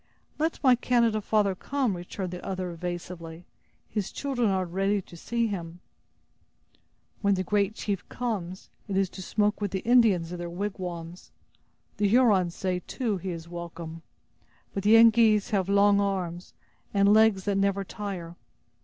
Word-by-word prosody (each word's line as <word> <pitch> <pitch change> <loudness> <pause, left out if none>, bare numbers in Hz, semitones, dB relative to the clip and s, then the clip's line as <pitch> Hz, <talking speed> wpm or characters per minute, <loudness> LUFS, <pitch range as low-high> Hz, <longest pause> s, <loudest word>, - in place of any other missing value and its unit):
"Let 320 +2 0
my 260 -2 +7
Canada 235 -3 +2
father 205 -2 +2
come," 255 +2 -1
returned 180 +1 -5
the 180 - -7
other, 185 -2 -3
evasively; 170 -1 -6 0.4
"his 210 -4 -3
children 255 -6 -1
are 190 -1 0
ready 195 +4 0
to 175 - -12
see 235 +7 -1
him." 175 -5 -5 1.4
"When 200 -1 +3
the 185 - -1
great 205 +2 0
chief 200 -5 -4
comes, 195 -7 -4 0.2
it 195 -2 -2
is 195 -1 +2
to 190 - -8
smoke 210 +3 0
with 205 - 0
the 190 0 -3
Indians 220 -9 +3
in 180 - -5
their 175 0 -4
wigwams. 175 -2 -5 0.7
The 205 0 +2
Hurons 200 -6 +3
say, 185 -1 -1
too, 230 -7 -1
he 185 +1 -5
is 165 -2 -6
welcome. 170 -1 -7 0.7
But 195 - -2
the 210 +3 +5
Yengeese 225 -1 +5
have 195 -2 0
long 200 0 +5
arms, 180 -3 -3 0.4
and 200 +1 +5
legs 220 -3 +4
that 200 -1 +1
never 200 0 +1
tire! 190 -4 -6
195 Hz, 155 wpm, -27 LUFS, 180-215 Hz, 1.4 s, my